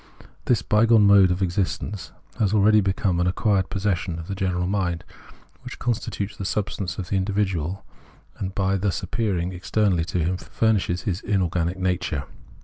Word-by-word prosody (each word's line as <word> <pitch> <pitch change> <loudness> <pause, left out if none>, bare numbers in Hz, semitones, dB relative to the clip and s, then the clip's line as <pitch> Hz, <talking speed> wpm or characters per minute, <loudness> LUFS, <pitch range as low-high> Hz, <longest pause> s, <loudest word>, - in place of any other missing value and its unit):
This 115 -7 +2
by 110 +2 +3
gone 110 -3 +6
mode 100 -2 +7
of 90 +2 0
existence 95 +2 -2 0.3
has 105 -1 +2
already 105 +1 +5
become 95 -2 0
an 90 - +2
acquired 95 0 +1
Preface 100 - -4
27 105 -2 +3 0.2
possession - - -6
of 80 - -8
the 100 - -3
general 90 -2 -1
mind, 90 -3 -1 0.6
wliicli 125 -2 -8
constitutes 110 -4 -2
the - - -6
substance 95 -2 -2
of 95 -2 -5
the 100 - +1
individual, 95 -2 -1 0.5
and, 95 -1 -4
by 95 0 +1
thus 95 0 -1
appearing 95 -6 -1
externally 95 -1 +1
to 90 - -3
him, 90 +2 0
furnishes 100 -4 0
his 100 -6 -2
inorganic 90 -3 0
nature. 90 -6 -1
95 Hz, 170 wpm, -24 LUFS, 90-105 Hz, 0.6 s, mode